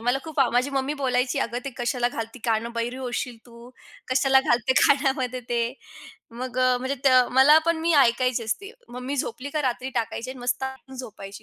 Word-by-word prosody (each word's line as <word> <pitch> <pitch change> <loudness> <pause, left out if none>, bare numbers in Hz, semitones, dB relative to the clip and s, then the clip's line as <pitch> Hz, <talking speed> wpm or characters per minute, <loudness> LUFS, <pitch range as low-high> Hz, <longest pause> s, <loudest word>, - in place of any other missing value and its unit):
मला 245 +3 +1
खूप 315 -2 -8
माझी 250 +3 +1
मम्मी 275 +2 -1
बोलायची 250 -2 0
"अगं 235 +2 -1
ते 275 - -4
कशाला 245 0 0
घालते 230 +1 -6
कान 225 0 +1
बहिरे 235 +2 -3
होशील 250 -1 -4
तू 235 +1 -14 0.4
कशाला 265 +1 +4
घालते 245 0 +1
कानामध्ये 265 -3 +2
ते" 235 -1 +1 0.7
मग 250 +1 -6
अ, 255 -1 +4
म्हणजे 260 +2 -2
त 275 - +7 0.2
मला 270 +4 +7
पण 335 -1 +3
मी 335 +1 +1
ऐकायची 250 -2 +3
असते. 395 - -4 0.2
मम्मी 250 +3 -5
झोपली 275 +1 -4
का 305 0 -1
रात्री 255 0 -2
टाकायची 235 +1 -3
आणि 260 - -9
मस्त 245 +2 -1 0.3
झोपायची 205 -6 -9
255 Hz, 180 wpm, -25 LUFS, 240-270 Hz, 0.7 s, त